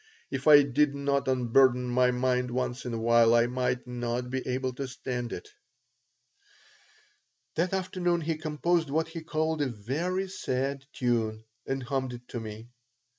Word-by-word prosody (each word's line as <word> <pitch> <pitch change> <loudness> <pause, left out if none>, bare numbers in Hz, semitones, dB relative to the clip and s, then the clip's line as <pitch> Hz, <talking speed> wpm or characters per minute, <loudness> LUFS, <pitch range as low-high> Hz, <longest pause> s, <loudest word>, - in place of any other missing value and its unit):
If 135 +2 -3
I 145 -1 +9
did 140 +1 +2
not 140 -1 0
unburden 125 0 +3
my 125 +1 +3
mind 125 0 +1
once 125 +1 -2
in 120 - -3
a - - -2
while 115 0 +5
I 120 0 +5
might 125 0 -1
not 125 0 -3
be 130 0 -1
able 130 0 -1
to 135 +2 -4
stand 125 -1 -4
it." - - -6 2.1
That 175 +3 0
afternoon 180 -2 0
he 165 +1 -1
composed 160 +1 0
what 160 +3 0
he 165 0 -6
called 160 -1 -1
a 145 - +2
"very 150 - -2
sad 135 -6 -2
tune," 110 -3 -1 0.2
and 135 -1 -2
hummed 130 -1 -2
it 120 0 -10
to 120 - -4
me. 110 +2 -8
130 Hz, 160 wpm, -28 LUFS, 125-150 Hz, 2.1 s, I